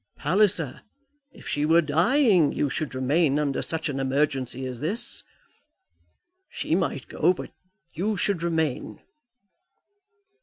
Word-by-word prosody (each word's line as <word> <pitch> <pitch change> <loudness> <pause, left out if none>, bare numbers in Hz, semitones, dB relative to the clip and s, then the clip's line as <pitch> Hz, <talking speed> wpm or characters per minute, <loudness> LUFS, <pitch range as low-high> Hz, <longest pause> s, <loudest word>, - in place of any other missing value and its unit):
Palliser, 170 -3 +1 0.5
if - - -14
she 145 - -1
were 165 +2 +4
dying, 175 - +3
you 140 - -1
should 155 -4 -4
remain 140 +3 +2
under 145 -2 -1
such 160 -1 -3
an 140 -2 -3
emergency 135 -1 -1
as 125 -2 -6
this. 185 - +1 1.3
She - - -3
might - - -1
go, 180 - +2
but - - -8 0.4
you 200 +5 -1
should 185 -2 -1
remain." 160 -5 -2
155 Hz, 120 wpm, -25 LUFS, 140-175 Hz, 1.3 s, were